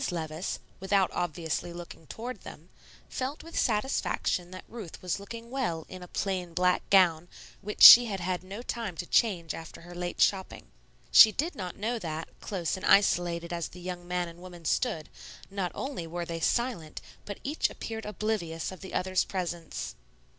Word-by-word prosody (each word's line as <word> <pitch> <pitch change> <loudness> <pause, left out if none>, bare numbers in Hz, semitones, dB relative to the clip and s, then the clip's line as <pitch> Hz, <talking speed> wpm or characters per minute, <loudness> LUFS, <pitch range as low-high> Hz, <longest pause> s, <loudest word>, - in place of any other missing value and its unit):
Levice, 160 0 -3 0.2
without 190 0 +2
obviously 170 0 -2
looking 170 -2 -10
toward 245 +3 -6
them, - - -12 0.4
felt 265 +3 -4
with 330 +1 -11
satisfaction 210 -5 0
that 185 0 -10
Ruth 220 -8 -9
was 180 +1 -1
looking 230 +4 -9
well 175 -12 -2
in 185 -1 -9
a 180 - -9
plain 180 -3 -3
black 180 0 +3
gown 175 -4 +5 0.3
which 210 +1 -1
she 245 +1 +13
had 200 -4 -3
had 180 0 -2
no 200 +5 -7
time 225 -9 -4
to 175 - -4
change 175 -6 +2
after 165 0 -9
her 175 +1 -11
late 175 0 -4
shopping. 190 -2 +1 0.4
She 220 - +10
did 315 - -2
not 180 -3 -6
know 230 +3 -2
that, 160 -3 -5
close 180 -4 -2
and 185 - -6
isolated 175 -3 +3
as 170 -1 -2
the 180 - -13
young 175 0 -6
man 180 0 -1
and 170 0 -11
woman 175 -2 -11
stood, 165 -5 0 0.4
not 195 -3 -2
only 265 -12 -4
were 170 +1 -4
they 165 0 -4
silent, 205 -4 -1 0.3
but 205 - -6
each 295 +4 0
appeared 220 -1 -6
oblivious 210 -7 -2
of 185 - -10
the 190 - -7
other's 185 0 +1
presence. 175 - -4
180 Hz, 175 wpm, -29 LUFS, 170-210 Hz, 0.4 s, she